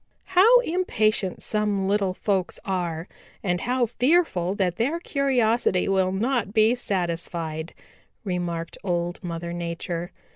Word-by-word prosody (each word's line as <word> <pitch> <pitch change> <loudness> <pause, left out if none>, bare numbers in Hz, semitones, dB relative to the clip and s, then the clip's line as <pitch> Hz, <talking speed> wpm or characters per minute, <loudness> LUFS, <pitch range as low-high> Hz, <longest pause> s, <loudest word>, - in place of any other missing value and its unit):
"How 450 +7 +7
impatient 215 - 0
some 210 -2 0
little 195 -2 +1
folks 190 -3 -1
are 175 -3 -2 0.4
and 180 -2 0
how 250 0 +1
fearful 245 - +1
that 185 -3 0
their 285 +9 0
curiosity 245 - +1
will 190 -1 +2
not 225 +1 -1
be 220 +1 +5
satisfied," 170 -6 -2 0.5
remarked 175 -4 -3
Old 175 -2 -2
Mother 170 0 -4
Nature. 170 0 -4
195 Hz, 115 wpm, -25 LUFS, 175-235 Hz, 0.5 s, How